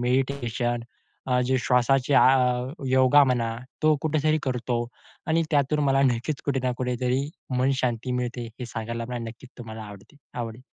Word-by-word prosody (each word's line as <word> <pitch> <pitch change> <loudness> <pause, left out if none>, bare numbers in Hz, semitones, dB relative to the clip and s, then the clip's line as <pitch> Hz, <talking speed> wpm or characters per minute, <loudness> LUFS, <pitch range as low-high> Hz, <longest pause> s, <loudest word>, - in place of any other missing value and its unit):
Meditation 120 -2 0 0.5
अ, 125 -1 +2
जे 130 +1 +2
श्वासाचे 130 +2 +2
आ 125 -1 +4 0.2
योगा 130 +2 +6
म्हणा, 115 -3 0 0.3
तो 155 0 +5
कुठेतरी 155 0 +1
करतो 125 -2 -1 0.4
आणि 165 +1 +2
त्यातून 145 0 +2
मला 135 0 +3
नक्कीच 130 +2 0
कुठे 135 -2 0
ना 125 - +1
कुठेतरी 125 +2 -1 0.3
मनशांती 125 -2 0
मिळते. 125 -1 -3
हे 125 - -4
सांगायला 115 +1 -4
मला 125 -1 -3
नक्कीच 120 +3 -12
तुम्हाला 110 -2 -8
आवडते 100 +6 -13 0.2
आवडेल. 120 +1 -5
125 Hz, 145 wpm, -25 LUFS, 120-135 Hz, 0.5 s, योगा